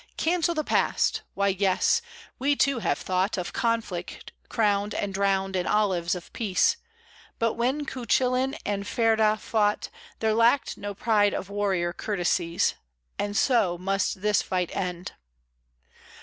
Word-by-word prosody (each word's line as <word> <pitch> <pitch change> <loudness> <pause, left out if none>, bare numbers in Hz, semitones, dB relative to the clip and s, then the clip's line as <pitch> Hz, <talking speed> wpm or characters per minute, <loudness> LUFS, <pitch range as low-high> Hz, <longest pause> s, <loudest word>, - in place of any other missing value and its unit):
Cancel 340 0 +1
the 310 - 0
past! - - +1
Why, 200 0 +2
yes! 195 - +2 0.4
We, 285 +3 +2
too, 275 -2 +2
have 145 -9 0
thought 185 +3 -1
Of 180 - -4
conflict 230 -1 -2 0.2
crowned 205 -2 +1
and 200 -1 -2
drowned 195 -1 0
in 180 -1 -1
olives 185 -5 +1
of 180 - -10
peace; 205 -6 +2 0.6
But 230 -1 +1
when 260 +5 -1
Cuchullin 255 +2 0
and 200 0 -2
Ferdiadh 220 -2 +2
fought 210 -1 0 0.3
There 220 -1 +1
lacked 230 +5 +3
no 205 0 -6
pride 205 -1 +2
of 195 - -5
warrior 190 -4 0
courtesies, 180 -2 0 0.5
And 205 0 -1
so 215 -9 +2
must 195 +1 -1
this 210 -1 +3
fight 180 -2 -2
end. 180 -1 -3
205 Hz, 135 wpm, -26 LUFS, 190-230 Hz, 0.6 s, lacked